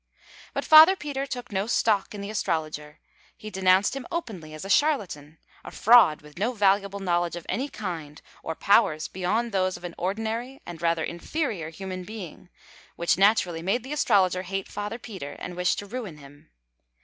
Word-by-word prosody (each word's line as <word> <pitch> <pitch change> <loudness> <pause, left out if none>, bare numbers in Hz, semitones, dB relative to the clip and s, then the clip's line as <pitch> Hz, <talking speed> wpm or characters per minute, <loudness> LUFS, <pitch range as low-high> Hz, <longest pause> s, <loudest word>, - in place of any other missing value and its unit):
But - - -2
Father 315 +4 +9
Peter 280 -5 -4
took 250 -3 -6
no 195 +1 -1
stock 215 -3 +1
in 200 - -6
the 200 +1 -5
astrologer. 155 -6 -3 0.4
He 215 - -9
denounced 190 +4 +3
him 270 -3 -6
openly 190 - -5
as 155 - -8
a - - -5
charlatan 190 - 0 0.3
a - - -8
fraud 220 -10 +5
with 150 +3 -13
no 230 +5 0
valuable 200 -1 +2
knowledge 175 -2 0
of 175 - -8
any 270 +4 -2
kind, 165 - -6 0.2
or 160 - -4
powers 165 -7 +3
beyond 215 +6 -1
those 185 -2 0
of - - -17
an 175 -1 -6
ordinary 225 +7 -3
and 170 -2 -9
rather 165 -1 +1
inferior 175 - -3
human 185 +2 -6
being, 185 -4 -9 0.5
which 170 - +1
naturally 195 -5 +3
made 200 +7 0
the 270 +3 -5
astrologer 185 -10 +2
hate 195 +1 -4
Father 205 +2 -5
Peter 190 -12 -8
and 180 - -8
wish 180 0 +1
to 205 - -6
ruin 210 -7 -6
him. 145 - -16
195 Hz, 175 wpm, -26 LUFS, 170-225 Hz, 0.5 s, Father